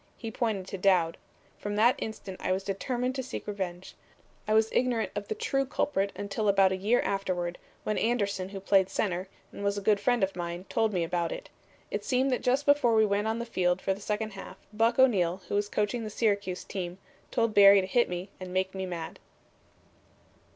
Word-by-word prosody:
He 225 Hz, -, -6 dB
pointed 215 Hz, -5 st, -1 dB
to 195 Hz, -, -5 dB
Dowd. 180 Hz, -4 st, +3 dB, 0.4 s
From 205 Hz, 0 st, -3 dB
that 230 Hz, +4 st, +5 dB
instant 205 Hz, -4 st, -6 dB
I -, -, 0 dB
was 190 Hz, +1 st, 0 dB
determined 245 Hz, +6 st, -2 dB
to 260 Hz, -, -2 dB
seek 260 Hz, -, -6 dB
revenge. 190 Hz, -3 st, -5 dB, 0.5 s
I 215 Hz, -, +2 dB
was 220 Hz, 0 st, +3 dB
ignorant 245 Hz, -3 st, +1 dB
of 205 Hz, 0 st, -4 dB
the 215 Hz, -, -2 dB
true 270 Hz, +4 st, 0 dB
culprit 200 Hz, -7 st, -1 dB
until 205 Hz, +1 st, -2 dB
about 195 Hz, -1 st, +5 dB
a -, -, +1 dB
year 210 Hz, +6 st, +2 dB
afterward, 180 Hz, -3 st, -2 dB, 0.2 s
when 215 Hz, -, -1 dB
Anderson, 200 Hz, -5 st, 0 dB
who 195 Hz, 0 st, -6 dB
played 195 Hz, -1 st, +3 dB
center, 185 Hz, -2 st, -1 dB, 0.2 s
and -, -, -8 dB
was 200 Hz, 0 st, 0 dB
a -, -, -2 dB
good 205 Hz, +1 st, +3 dB
friend 240 Hz, +1 st, +2 dB
of 190 Hz, -, 0 dB
mine, 175 Hz, +1 st, -5 dB
told 225 Hz, -1 st, +1 dB
me 180 Hz, -4 st, 0 dB
about 170 Hz, 0 st, -1 dB
it. -, -, -7 dB, 0.4 s
It -, -, -2 dB
seemed 260 Hz, +1 st, +1 dB
that 250 Hz, -, 0 dB
just 260 Hz, +3 st, +1 dB
before 285 Hz, -5 st, +4 dB
we 220 Hz, 0 st, +5 dB
went 205 Hz, +1 st, 0 dB
on 220 Hz, +1 st, 0 dB
the 235 Hz, -, -3 dB
field 180 Hz, -5 st, +1 dB
for 195 Hz, -, 0 dB
the 195 Hz, -, -10 dB
second 215 Hz, +1 st, -2 dB
half 195 Hz, -1 st, -9 dB, 0.2 s
Buck 225 Hz, +2 st, +2 dB
O'Neil, 190 Hz, -8 st, +3 dB
who -, -, -3 dB
was 205 Hz, 0 st, 0 dB
coaching 210 Hz, +3 st, -1 dB
the 215 Hz, -, -4 dB
Syracuse 200 Hz, -4 st, 0 dB
team, 180 Hz, -2 st, -5 dB, 0.3 s
told 230 Hz, -2 st, +1 dB
Barry 200 Hz, -1 st, +8 dB
to 190 Hz, -, -1 dB
hit 235 Hz, +6 st, +2 dB
me 180 Hz, +2 st, -4 dB
and 185 Hz, -1 st, -7 dB
make 190 Hz, +1 st, 0 dB
me 190 Hz, -1 st, -4 dB
mad." 170 Hz, -3 st, -6 dB
200 Hz, 210 wpm, -29 LUFS, 185-225 Hz, 0.5 s, Barry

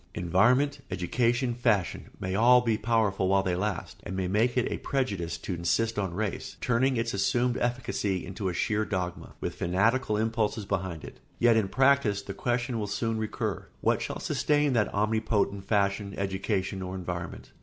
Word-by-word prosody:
] -, -, -19 dB
Environment, 125 Hz, -, +3 dB
education, 120 Hz, +7 st, 0 dB
fashion, 110 Hz, -7 st, 0 dB
may 95 Hz, -, -3 dB
be -, -, -1 dB
all 120 Hz, +4 st, +6 dB, 0.2 s
powerful 105 Hz, -4 st, +1 dB
while 95 Hz, 0 st, +3 dB
they 90 Hz, -2 st, 0 dB
last 95 Hz, -1 st, -3 dB
and 95 Hz, -, -6 dB
may 95 Hz, -1 st, -1 dB
make 110 Hz, +7 st, +1 dB
it 125 Hz, -, +3 dB
seem -, -, -2 dB
a -, -, -9 dB
prejudice 100 Hz, -12 st, -1 dB
to 95 Hz, -, -5 dB
insist 105 Hz, +6 st, 0 dB
on 95 Hz, -4 st, -2 dB
race, 105 Hz, -1 st, -3 dB
turning 125 Hz, +2 st, +2 dB
its 115 Hz, 0 st, -1 dB
assumed 120 Hz, +5 st, +1 dB
efficacy 120 Hz, -6 st, -1 dB
into 95 Hz, +1 st, -3 dB
a -, -, -3 dB
sheer 110 Hz, +4 st, +1 dB
dogma, 90 Hz, -4 st, -4 dB
with -, -, -2 dB
fanatical 105 Hz, +5 st, +1 dB
impulses 110 Hz, -1 st, 0 dB
behind 95 Hz, -5 st, -3 dB
it; -, -, -10 dB, 0.2 s
yet 120 Hz, -1 st, +5 dB
in 110 Hz, -3 st, +2 dB
practice 130 Hz, -5 st, +3 dB
the 100 Hz, -, -6 dB
question 120 Hz, +2 st, -1 dB
will 105 Hz, -, -2 dB
soon 110 Hz, +2 st, -1 dB
recur: 110 Hz, -1 st, -3 dB
What -, -, +2 dB
shall -, -, -4 dB
sustain 145 Hz, -2 st, +1 dB
that 110 Hz, -4 st, +2 dB
omnipotent 105 Hz, -1 st, 0 dB
fashion, 100 Hz, -1 st, 0 dB
education, 95 Hz, 0 st, -2 dB
or 95 Hz, 0 st, -5 dB
environment? 90 Hz, -2 st, -6 dB
105 Hz, 175 wpm, -28 LUFS, 95-120 Hz, 0.2 s, all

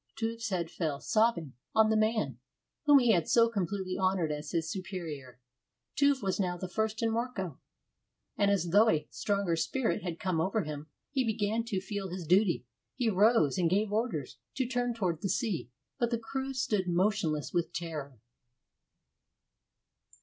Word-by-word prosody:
Tuve's 225 Hz, 0 st, -2 dB
head 175 Hz, -4 st, -2 dB
fell, 155 Hz, -5 st, -2 dB
sobbing, 215 Hz, -, +1 dB, 0.2 s
on 220 Hz, 0 st, +5 dB
the -, -, +3 dB
man 215 Hz, -, +1 dB, 0.5 s
whom 290 Hz, -1 st, +8 dB
he 245 Hz, -4 st, +5 dB
had 175 Hz, -6 st, +2 dB
so 230 Hz, -1 st, +6 dB
completely 190 Hz, -3 st, -2 dB
honored 185 Hz, -4 st, +1 dB
as 150 Hz, 0 st, -4 dB
his 165 Hz, 0 st, -1 dB
superior. 165 Hz, -9 st, -6 dB, 0.6 s
Tuve 280 Hz, -3 st, +3 dB
was 190 Hz, 0 st, 0 dB
now 180 Hz, -2 st, 0 dB
the 185 Hz, -, -5 dB
first 220 Hz, +3 st, -1 dB
in 225 Hz, -, +2 dB
Mörkö, 225 Hz, -, -3 dB, 0.8 s
and 200 Hz, -, +2 dB
as 185 Hz, -4 st, +1 dB
though 215 Hz, +4 st, +6 dB
a 155 Hz, -7 st, +1 dB
stronger 200 Hz, -4 st, 0 dB
spirit 225 Hz, +7 st, 0 dB
had 170 Hz, -3 st, -5 dB
come 180 Hz, -4 st, 0 dB
over 195 Hz, +4 st, 0 dB
him, 150 Hz, -1 st, -6 dB, 0.2 s
he 270 Hz, -2 st, +1 dB
began 220 Hz, 0 st, 0 dB
to 210 Hz, -5 st, -1 dB
feel 195 Hz, 0 st, -4 dB
his 180 Hz, -1 st, -5 dB
duty. 180 Hz, -3 st, +3 dB, 0.3 s
He 245 Hz, -3 st, +1 dB
rose, 200 Hz, -, +4 dB
and 170 Hz, -2 st, +3 dB
gave 205 Hz, +3 st, +1 dB
orders 210 Hz, -, -2 dB, 0.2 s
to 260 Hz, -, 0 dB
turn 245 Hz, -1 st, -1 dB
toward 175 Hz, -7 st, -1 dB
the 195 Hz, -, -1 dB
sea, 185 Hz, -, -1 dB, 0.3 s
but 240 Hz, -, +2 dB
the 235 Hz, -, 0 dB
crew 265 Hz, +4 st, -4 dB
stood 220 Hz, -8 st, 0 dB
motionless 175 Hz, -4 st, 0 dB
with 170 Hz, -1 st, 0 dB
terror. 150 Hz, -6 st, -5 dB
195 Hz, 165 wpm, -31 LUFS, 170-225 Hz, 0.8 s, whom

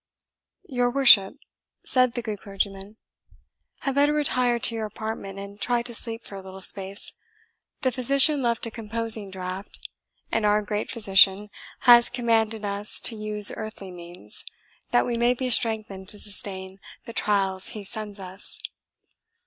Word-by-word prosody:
"Your 245 Hz, -2 st, 0 dB
worship," 245 Hz, -7 st, +6 dB, 0.5 s
said 255 Hz, -2 st, +3 dB
the 240 Hz, -, -4 dB
good 215 Hz, -3 st, -5 dB
clergyman, 195 Hz, +1 st, -4 dB, 0.8 s
"had 275 Hz, -, -1 dB
better 285 Hz, +2 st, +3 dB
retire 255 Hz, -5 st, +1 dB
to 235 Hz, -, +1 dB
your 220 Hz, -1 st, -3 dB
apartment, 210 Hz, -2 st, -6 dB
and 200 Hz, +1 st, -9 dB
try 240 Hz, -1 st, +1 dB
to 240 Hz, 0 st, -3 dB
sleep 230 Hz, 0 st, -5 dB
for -, -, -12 dB
a 195 Hz, -, -7 dB
little 190 Hz, 0 st, -11 dB
space. 195 Hz, +1 st, -1 dB, 0.7 s
The 260 Hz, -, +1 dB
physician 275 Hz, +3 st, +3 dB
left 235 Hz, -2 st, 0 dB
a 230 Hz, -, -6 dB
composing 225 Hz, -2 st, -2 dB
draught; 190 Hz, +1 st, -7 dB, 0.5 s
and 225 Hz, -, 0 dB
our 210 Hz, 0 st, +3 dB
Great 210 Hz, 0 st, -3 dB
Physician 200 Hz, -1 st, +4 dB, 0.3 s
has 240 Hz, -2 st, +7 dB
commanded 225 Hz, -3 st, 0 dB
us 205 Hz, +1 st, +1 dB
to 230 Hz, -, +1 dB
use 210 Hz, -1 st, +3 dB
earthly 215 Hz, -3 st, -7 dB
means, 175 Hz, -11 st, -3 dB, 0.5 s
that 120 Hz, -, +3 dB
we 235 Hz, -, -2 dB
may 240 Hz, +1 st, +2 dB
be 255 Hz, 0 st, -2 dB
strengthened 215 Hz, -4 st, 0 dB
to 210 Hz, -, 0 dB
sustain 195 Hz, -3 st, -4 dB, 0.2 s
the 230 Hz, -, -9 dB
trials 195 Hz, -3 st, +1 dB
He 210 Hz, -, -5 dB
sends 205 Hz, 0 st, -6 dB
us." 190 Hz, +1 st, -3 dB
215 Hz, 150 wpm, -25 LUFS, 195-235 Hz, 0.8 s, has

